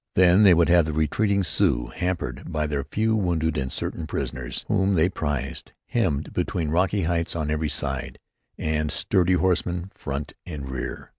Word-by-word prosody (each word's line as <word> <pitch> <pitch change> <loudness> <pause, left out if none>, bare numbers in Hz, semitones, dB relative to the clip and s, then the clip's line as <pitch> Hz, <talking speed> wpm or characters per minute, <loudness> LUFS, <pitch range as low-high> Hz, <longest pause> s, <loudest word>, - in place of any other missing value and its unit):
Then 90 +2 +6
they 95 -4 +7
would 85 0 +4
have 85 -2 +5
the 80 - -3
retreating 100 +6 +1
Sioux, 75 -6 +1
hampered 90 -1 -3
by 75 -2 0
their 75 -2 -2
few 110 +10 0
wounded 85 -6 0
and 65 -2 -2
certain 80 +4 -4
prisoners 60 -4 -4
whom 100 -2 +2
they 85 0 +3
prized, 75 -3 -4
hemmed 85 - -1
between 80 -4 -1
rocky 95 +3 +2
heights 85 0 -1
on 75 -2 -1
every 75 0 0
side, 70 -4 -2 0.4
and 75 -1 -1
sturdy 95 +4 +2
horsemen 90 0 0
front 70 +1 -5
and 75 -6 -7
rear. 65 -1 -5
80 Hz, 165 wpm, -25 LUFS, 75-90 Hz, 0.4 s, they